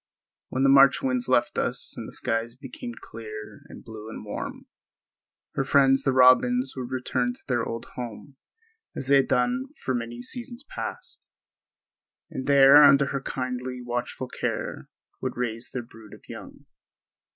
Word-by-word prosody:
When 130 +1 -1
the 135 - +5
March 135 0 +6
winds 125 -2 0
left 120 -2 +2
us - - -1
and - - -7
the - - -9
skies 115 +1 -2
became 125 -3 -8
clear 110 -1 -9
and - - -11
blue 110 -1 -9
and 110 - -8
warm, 105 - -6 0.9
her - - 0
friends 135 -1 +4
the 135 - +1
robins 125 0 +5
would 125 -2 -5
return 125 -1 -1
to - - -22
their 120 -3 0
old 115 +1 -5
home 125 +3 -7 0.6
as 135 - -4
they 140 - +7
had 135 - +3
done 245 - +1 0.2
for 130 - 0
many 120 0 -4
seasons 240 - -4
past, - - -7 1.0
and 130 - -5
there 140 0 +8
under 140 -1 +6
her 140 - -2
kindly, 125 -1 -4
watchful 120 +1 -3
care - - -4 0.3
would - - -3
raise 115 -1 -2
their 125 - -5
brood 115 -2 -14
of - - -20
young. - - -11
125 Hz, 160 wpm, -26 LUFS, 120-135 Hz, 1.0 s, there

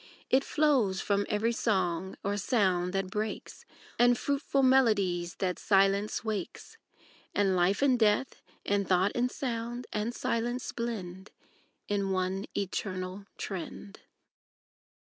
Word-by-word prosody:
It 265 +1 +4
flows 270 -13 +2
from 200 0 0
every 215 +2 +1
song 190 -5 0
or 200 +1 0
sound 190 -4 +1
that 195 -1 -2
brakes, 215 +2 -4 0.3
And 245 0 +5
fruitful 280 -1 0
melodies 205 -10 +3
that 180 -2 -2
silence 195 +1 +2
wakes; 215 -1 -5 0.6
And 195 -2 +2
life 185 +7 +2
and 260 -3 +4
death, 220 +4 +2 0.2
and 200 -1 +1
tho't, 185 +2 +3
and 245 +1 +1
sound 240 -2 -4
and 215 +2 -1
silence 240 +2 -2
blend 195 -5 -5 0.6
In 200 -1 0
one 190 +1 -1
eternal 190 0 -3
trend. 195 +2 -6
205 Hz, 120 wpm, -30 LUFS, 190-235 Hz, 0.6 s, And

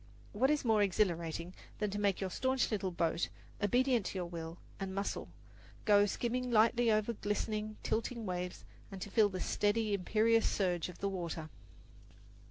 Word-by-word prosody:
What 250 +6 +3
is 300 -3 +1
more 220 -2 +4
exhilarating 175 -3 0 0.2
than 210 -2 -1
to 205 - -3
make 200 -2 +1
your 190 -2 -2
staunch 260 +5 +1
little 195 -3 0
boat, 170 -1 0 0.3
obedient 245 +1 +2
to - - -4
your 180 - -2
will 165 -1 -6 0.2
and 190 -1 -4
muscle, 200 0 -2 0.6
go 205 -1 +6
skimming 250 +4 -1
lightly 230 +1 +4
over 215 +2 +2
glistening, 215 0 -2
tilting 230 +1 -1
waves, 180 -1 -4 0.3
and 195 - -7
to 200 - -6
feel 215 -1 +5
the 185 -1 -5
steady, 210 +2 +1
imperious 220 +4 +3
surge 180 -3 0
of 180 - -10
the 200 - +1
water! 170 -4 -4
205 Hz, 165 wpm, -34 LUFS, 180-225 Hz, 0.6 s, go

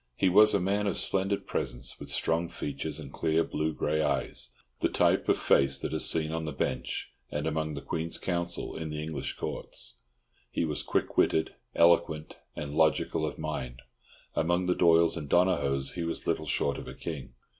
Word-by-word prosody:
He 95 - +3
was 105 +3 +7
a - - +3
man 100 +3 0
of 100 - 0
splendid 100 +1 +1
presence, - - -3
with - - -8
strong 85 +1 +1
features 75 -4 -4
and - - -9
clear 80 +1 +2
blue 80 0 -1
grey 75 0 0
eyes—the 60 -4 -2
type - - +2
of - - +4
face 70 0 +3
that - - -4
is - - +4
seen 80 -1 +1
on 80 -1 -2
the 75 - -3
Bench 65 -2 -3 0.2
and 75 +1 -3
among 80 -1 -1
the - - -6
Queen's 80 +1 -2
Counsel 85 -1 -2
in 80 -1 -4
the 75 0 -4
English 80 0 -3
Courts. - - -6 0.5
He 85 - -1
was 75 -2 -2
quick - - -1
witted, 80 - +2 0.2
eloquent, 85 -2 +3 0.2
and 75 -1 -5
logical 80 0 +2
of 75 - -6
mind. 65 -5 -5 0.5
Among 85 +3 +1
the 90 - +3
Doyles 85 -1 +4
and 75 -3 -6
Donohoes 70 -7 +2
he 85 - -4
was 85 0 -4
little 80 -2 -1
short 70 - 0
of - - -9
a - - -8
king. 75 -7 -6
80 Hz, 185 wpm, -29 LUFS, 75-85 Hz, 0.5 s, was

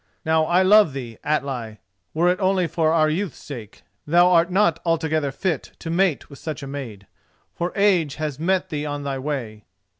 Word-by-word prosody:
Now, 160 0 +3
I 175 +3 +3
love 205 -5 +5
thee, 120 -5 -7
Atli, 135 -7 -2 0.4
were 170 +3 +3
it 180 +2 +1
only 190 -2 +2
for 160 -1 +1
our 160 -1 +3
youth's 170 +5 -2
sake, 115 -7 -10 0.2
and 160 - -2
thou 175 +1 +6
art 170 0 +4
not 180 -4 +2
altogether 160 -3 0
fit 160 0 -3
to 165 - -6
mate 175 -3 +1
with 140 - -13
such 155 -2 -6
a - - -6
maid, 125 -8 -7 0.5
for 175 +1 -3
age 185 -8 +2
has 150 -3 -4
met 185 +3 0
thee 150 -1 -3
on 145 0 -4
thy 135 -1 -3
way. 125 -7 -5
155 Hz, 190 wpm, -22 LUFS, 140-175 Hz, 0.5 s, thou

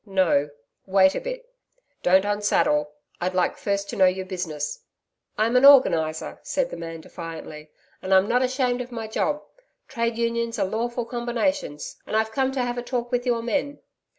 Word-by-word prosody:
'No, 185 -8 +2 0.4
wait 190 0 +5
a - - -3
bit. - - -6 0.6
Don't 190 +2 +4
unsaddle. 205 -8 +1 0.3
I'd 180 +1 -1
like 180 - +1
first 200 0 -2
to - - -5
know 190 -1 +5
your 185 +1 -1
business.' 160 -6 -4 0.6
'I'm 225 +3 +1
an 250 - +3
Organiser,' 165 - +5
said 270 -2 -1
the - - -5
man 165 -1 -7
defiantly, 160 -3 -9 0.3
'and 190 - -5
I'm 190 +1 +5
not 245 +3 +2
ashamed 255 -1 0
of 250 0 -8
my 225 -2 -5
job. 295 +7 -1 0.4
Trades 235 -3 -2
Unions 235 0 -1
are 200 - +1
lawful 235 +4 -2
combinations, 240 - -2
and - - -3
I've 220 0 0
come 265 +2 0
to 260 -2 0
have 245 0 -2
a - - -3
talk 245 0 -3
with 245 0 -1
your 235 -2 +1
men....' 285 +4 -1
220 Hz, 180 wpm, -24 LUFS, 185-245 Hz, 0.6 s, wait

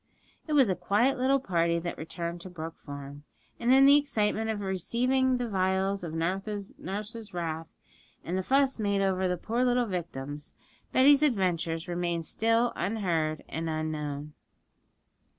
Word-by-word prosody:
It 310 - -2
was 275 -5 +6
a 185 - +1
quiet 210 +10 +1
little 270 +2 +3
party 170 -7 +1
that 170 +1 -3
returned 170 +1 -5
to 185 - -8
Brook 165 -2 -7
Farm; 140 0 -9 0.4
and 235 +1 +2
in 270 +1 +7
the 280 +1 +8
excitement 220 -6 0
of 220 -2 -1
receiving 250 +7 +1
the 245 -1 -2
vials 190 -1 0
of 165 -2 -5
nurse's 200 +3 -4
wrath, 165 -2 -3 0.6
and 175 - -3
the 190 - +1
fuss 270 +4 +2
made 200 -2 +1
over 190 -1 +1
the 180 0 -1
poor 230 +7 -1
little 245 -1 +2
victims, 150 -7 -5 0.4
Betty's 275 +2 +6
adventures 180 - +1
remained 175 -1 -2
still 230 +6 +1
unheard 170 -7 -1
and 165 0 -3
unknown. 150 -2 -3
190 Hz, 150 wpm, -29 LUFS, 165-235 Hz, 0.6 s, the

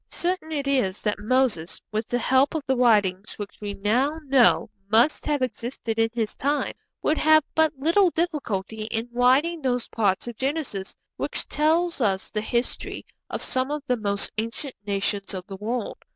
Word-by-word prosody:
Certain 350 -2 -2
it 285 -3 -2
is 250 -9 +1
that 210 -1 0
Moses, 220 -7 +1
with 215 +1 -2
the 245 - 0
help 265 +5 +3
of 310 - -1
the 265 - +1
writings 210 -5 +2
which 205 0 -8
we 205 -1 -4
now 255 +10 +1
know 270 -3 +4 0.2
must 230 +8 +3
have 290 -3 +1
existed 230 -1 -3
in 225 0 +3
his 225 -2 -2
time, 290 +2 0 0.3
would 305 - +2
have 310 0 +6
but 315 -2 +2
little 340 +7 +4
difficulty 225 - -2
in 225 +1 -3
writing 265 +8 +3
those 250 -3 0
parts 205 -1 0
of 240 - -5
Genesis 265 -9 -3 0.2
which - - -3
tell 325 +4 +2
us 195 -6 0
the 210 - -1
history 235 +3 -2 0.2
of - - -4
some 260 +1 0
of 295 -1 -3
the 250 - +1
most 200 -2 0
ancient 230 +5 -4
nations 200 0 -1
of 180 -1 -6
the 195 - -8
world. 225 +3 -3
245 Hz, 175 wpm, -25 LUFS, 210-290 Hz, 0.3 s, have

